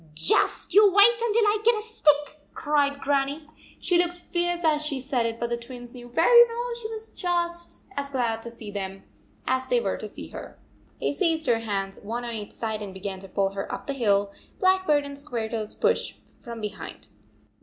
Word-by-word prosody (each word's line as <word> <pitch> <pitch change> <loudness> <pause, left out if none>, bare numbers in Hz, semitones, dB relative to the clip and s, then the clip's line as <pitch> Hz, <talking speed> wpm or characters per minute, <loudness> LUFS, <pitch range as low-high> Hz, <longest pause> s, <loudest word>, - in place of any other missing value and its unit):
" 150 - -25
Just 160 +2 +1
you 420 - +8
wait 445 +5 +6
until 460 -1 +3
I 415 +1 +3
get 470 +1 +5
a - - -3
stick," 300 -8 +1
cried 285 -1 +1
Grannie. 285 +2 0 0.3
She 350 -1 +2
looked 350 0 0
fierce 350 0 -2
as 305 -2 +3
she 295 -3 -1
said 255 -3 0
it, 230 0 -5
but 235 - -2
the 235 - -1
Twins 245 0 -10
knew 245 -1 -10
very 475 - +7
well 475 +1 -3
she 440 - -5
was 445 -1 -6
just 345 -3 -2
as 280 0 -3
glad 235 -4 -1
to 235 - -7
see 225 -3 -9
them 195 -1 -5 0.4
as 260 0 0
they - - +3
were - - -1
to - - -6
see - - -10
her. - - -9 0.4
They - - 0
seized 325 -1 +1
her 230 -2 +3
hands, 195 -3 -3
one 235 +4 -4
on 235 - -4
each 210 -2 -6
side, 220 -2 -3
and 195 -2 -7
began 190 0 -5
to 195 0 -12
pull 195 +1 0
her 195 0 -5
up - - -5
the 280 - -2
hill. 205 -6 +1 0.2
Blackbird 375 -7 +3
and 280 0 -7
Squaretoes 225 -6 -4
pushed - - +1 0.2
from 235 -1 -8
behind. 210 -1 -7
275 Hz, 205 wpm, -26 LUFS, 225-345 Hz, 0.4 s, you